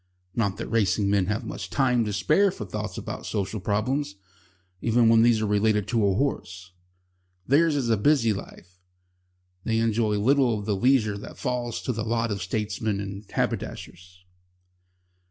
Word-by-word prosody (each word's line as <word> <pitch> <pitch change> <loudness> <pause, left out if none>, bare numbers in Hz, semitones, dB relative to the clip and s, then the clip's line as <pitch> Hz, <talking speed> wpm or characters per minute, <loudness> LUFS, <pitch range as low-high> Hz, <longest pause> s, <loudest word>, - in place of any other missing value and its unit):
Not 100 -4 -1
that 115 - -4
racing 100 -2 +1
men 100 -3 +2
have 105 +1 -1
much - - -6
time 125 -4 +2
to 105 - -2
spare 155 - +3
for 110 - -6
thoughts 90 - -5
about - - -6
social 105 +1 -2
problems, 105 +5 -1 0.7
even 115 0 +3
when 115 0 +6
these 115 -2 +4
are - - +1
related 105 0 +1
to 115 -3 +1
a 95 - +1
horse. 95 -8 -3 0.7
Theirs 155 +3 +3
is 135 -4 0
a 110 - +3
busy 115 -1 +3
life. 90 -2 -10 0.8
They 115 -1 0
enjoy 110 -1 +1
little 125 +1 +3
of 105 - -6
the 105 -2 0
leisure 110 -2 +2
that - - -10
falls 125 -3 -3
to 125 - -1
the 110 -1 -3
lot 115 0 -1
of 100 -2 -3
statesmen 105 +2 -2
and 100 0 -7
haberdashers. 90 0 -4
110 Hz, 165 wpm, -25 LUFS, 100-120 Hz, 0.8 s, when